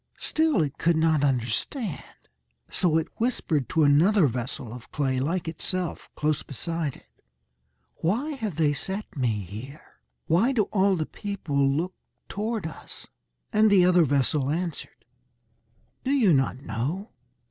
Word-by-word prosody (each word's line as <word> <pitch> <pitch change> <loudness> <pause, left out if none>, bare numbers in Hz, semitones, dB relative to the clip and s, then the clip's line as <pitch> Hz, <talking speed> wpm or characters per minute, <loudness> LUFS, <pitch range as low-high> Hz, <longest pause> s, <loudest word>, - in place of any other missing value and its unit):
Still 315 - +1
it 140 -1 -5
could 170 +1 +3
not 160 -2 +3
understand. 135 - -1 0.7
So 165 -3 +2
it 160 - 0
whispered 175 - 0
to 160 - +3
another 165 +7 +5
vessel 125 -2 -3
of 120 -1 -11
clay, 135 -3 0
like 165 +6 -1
itself, 175 +2 -3
close 150 0 0
beside 160 +1 -3
it, - - -22 0.8
"Why 235 - 0
have 220 - -4
they 150 -2 +2
set 190 +7 -5
me 130 -4 +1
here? 110 - -10 0.3
Why 205 +12 +3
do 225 -5 +3
all 195 -1 +4
the 160 -3 -1
people 150 -10 -1
look 165 +7 -1 0.4
toward 215 -1 -2
us?" 160 - -9 0.5
And 215 +1 +5
the 190 -3 +6
other 180 -1 +5
vessel 140 0 +1
answered, 170 +2 -4 1.0
"Do 260 - -2
you 250 - +4
not 135 -1 +1
know? 140 - -3
160 Hz, 140 wpm, -26 LUFS, 140-195 Hz, 1.0 s, the